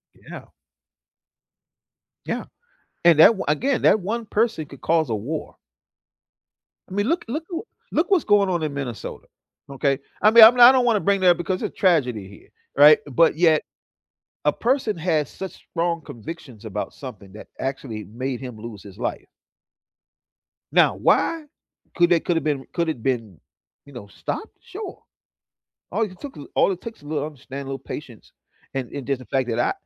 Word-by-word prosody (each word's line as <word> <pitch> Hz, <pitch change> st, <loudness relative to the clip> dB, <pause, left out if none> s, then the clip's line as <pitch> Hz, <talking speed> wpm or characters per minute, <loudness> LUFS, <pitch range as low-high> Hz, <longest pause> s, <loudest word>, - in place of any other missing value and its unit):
Yeah. -, -, -11 dB, 1.8 s
Yeah, -, -, -3 dB, 0.6 s
and 170 Hz, -3 st, +6 dB
that -, -, +10 dB
o -, -, -3 dB
Again, 245 Hz, -, 0 dB
that 215 Hz, -, +5 dB
one 225 Hz, +5 st, -3 dB
person 215 Hz, -7 st, 0 dB
could 140 Hz, -, -13 dB
cause 160 Hz, -4 st, +1 dB
a 110 Hz, -, +1 dB
war. 140 Hz, +10 st, -5 dB, 1.3 s
I -, -, -9 dB
mean, 205 Hz, +2 st, 0 dB
look 340 Hz, +5 st, 0 dB
look 295 Hz, +8 st, -3 dB
who 340 Hz, +1 st, -4 dB, 0.3 s
Look 330 Hz, -, +1 dB
what's 380 Hz, -5 st, +3 dB
going 205 Hz, -2 st, +4 dB
on 175 Hz, -3 st, -1 dB
in 150 Hz, -2 st, -2 dB
Minnesota, 130 Hz, -5 st, -6 dB, 0.4 s
okay. 140 Hz, 0 st, 0 dB, 0.2 s
I 215 Hz, -, +7 dB
mean, 230 Hz, 0 st, +10 dB
I'm 240 Hz, +3 st, +8 dB
I 240 Hz, +1 st, +11 dB
don't 260 Hz, -1 st, +3 dB
wanna 230 Hz, -3 st, +3 dB
bring 200 Hz, 0 st, +1 dB
that 185 Hz, -, +5 dB
up 175 Hz, -, +5 dB
because 185 Hz, +1 st, -2 dB
it's -, -, -5 dB
tragedy 125 Hz, -, +1 dB
here, 100 Hz, -, -16 dB, 0.3 s
right? 150 Hz, +2 st, +8 dB
But 150 Hz, +3 st, +3 dB
yet, 160 Hz, -2 st, +4 dB, 0.8 s
a -, -, +3 dB
person 245 Hz, -3 st, 0 dB
has 155 Hz, -5 st, 0 dB
such 190 Hz, -1 st, -7 dB, 0.2 s
strong 170 Hz, -1 st, -1 dB
convictions 120 Hz, -3 st, -10 dB
about 105 Hz, -1 st, -4 dB
something 105 Hz, -8 st, -10 dB
that 105 Hz, -, -11 dB
actually 130 Hz, -5 st, -4 dB
made 125 Hz, +5 st, -5 dB
him 125 Hz, -4 st, -8 dB
lose 105 Hz, -3 st, -9 dB
his 100 Hz, -1 st, -13 dB
life. 120 Hz, -, -4 dB, 1.5 s
Now, -, -, +4 dB
why 325 Hz, -2 st, +1 dB, 0.5 s
could 175 Hz, -1 st, +4 dB
they 175 Hz, -2 st, +4 dB
could 170 Hz, +1 st, -1 dB
have -, -, -1 dB
been 145 Hz, -3 st, -1 dB
could 170 Hz, -2 st, 0 dB
it 155 Hz, -, -2 dB
have 115 Hz, -, -15 dB
been, 115 Hz, -, -2 dB, 0.5 s
you 140 Hz, -, -15 dB
know, 120 Hz, -5 st, -9 dB
stopped? 420 Hz, -, -6 dB
Sure, 385 Hz, 0 st, -8 dB, 0.9 s
all -, -, -1 dB
it 185 Hz, -4 st, -4 dB
took 285 Hz, -, -8 dB
a 145 Hz, -, -9 dB
all -, -, +3 dB
it 180 Hz, -, -7 dB
takes 225 Hz, -9 st, -9 dB
a -, -, -14 dB
little 150 Hz, -1 st, -2 dB
understanding, 140 Hz, -2 st, -8 dB
a -, -, -7 dB
little 135 Hz, 0 st, -4 dB
patience, 125 Hz, -7 st, -9 dB, 0.4 s
and 130 Hz, -3 st, -3 dB
and 140 Hz, -3 st, -6 dB
just 135 Hz, -1 st, -1 dB
the 130 Hz, -, -12 dB
fact 130 Hz, -2 st, -1 dB
that 115 Hz, -1 st, -1 dB
I -, -, +2 dB
155 Hz, 185 wpm, -23 LUFS, 130-200 Hz, 1.8 s, I